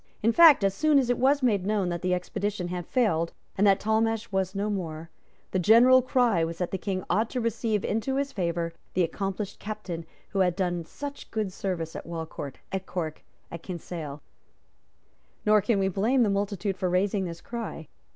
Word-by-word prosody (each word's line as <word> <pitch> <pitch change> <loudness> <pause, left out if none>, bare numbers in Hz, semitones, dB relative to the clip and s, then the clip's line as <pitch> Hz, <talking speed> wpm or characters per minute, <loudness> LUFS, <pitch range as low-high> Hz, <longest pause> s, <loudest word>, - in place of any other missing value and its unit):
In 225 - +4
fact, 310 -4 +7
as 195 -1 +2
soon 305 +6 +3
as 250 -3 +3
it 245 - 0
was 275 +2 +3
known 205 -4 +1
that 170 -1 -3
the 180 0 +1
expedition 180 +1 -3
had 180 -1 -4
failed, 170 -10 +1 0.2
and 205 +2 +3
that 195 0 +5
Talmash 225 +1 0
was 190 0 -1
no 200 +1 -1
more, 165 -5 -4 0.4
the 185 - +1
general 240 +7 +7
cry 245 -8 +2
was 165 0 -3
that 180 0 -2
the 190 - -2
King 185 -1 -2
ought 215 +6 +1
to 255 - -2
receive 225 -2 -1
into 225 +5 -1
his 280 0 -1
favour 170 -5 -2 0.2
the 185 - +3
accomplished 195 +4 -3
Captain 175 -6 -6 0.2
who 195 - -2
had 180 -2 +3
done 175 -3 -1
such 285 - -8
good 215 -4 -2
service 175 -5 -3
at - - -7
Walcourt, 160 -4 -6 0.2
at 190 0 -3
Cork 160 -4 -4 0.3
and 170 - -6
at - - -27
Kinsale. 165 -5 -6 1.2
Nor 210 0 +5
can 210 +1 +1
we 195 -1 +2
blame 220 +7 +2
the 210 - +2
multitude 200 -1 -1
for 185 -1 0
raising 190 +2 +1
this 170 -1 -6
cry. 225 - -6
195 Hz, 190 wpm, -27 LUFS, 175-220 Hz, 1.2 s, fact